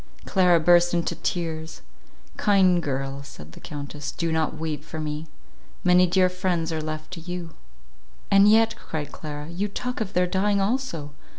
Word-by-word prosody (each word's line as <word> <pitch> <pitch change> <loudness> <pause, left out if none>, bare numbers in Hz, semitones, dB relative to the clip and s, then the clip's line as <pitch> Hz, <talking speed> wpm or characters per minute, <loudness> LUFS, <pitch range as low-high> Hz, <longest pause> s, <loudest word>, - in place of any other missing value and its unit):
Clara 180 -3 +4
burst 175 +1 +5
into 170 - 0
tears; 165 -3 -4 0.5
"Kind 185 -4 +4
girl," 135 -2 -3
said 80 - -12
the - - -13
Countess, 145 0 -6
"do 165 -1 -2
not 160 0 0
weep 155 -2 -4
for 155 +1 -7
me. 155 +1 -4 0.6
Many 180 0 +5
dear 185 +1 +4
friends 180 -2 -1
are 160 - -2
left 155 +1 -5
to 180 - -6
you." 175 0 -6 0.8
"And 200 +1 +7
yet," 225 +1 +4
cried 150 -2 -6
Clara, 150 -1 -7
"you 180 +5 -2
talk 250 +4 -4
of 205 -3 -3
their 180 0 +3
dying 200 +3 +1
also. 195 - -2
170 Hz, 165 wpm, -25 LUFS, 155-185 Hz, 0.8 s, And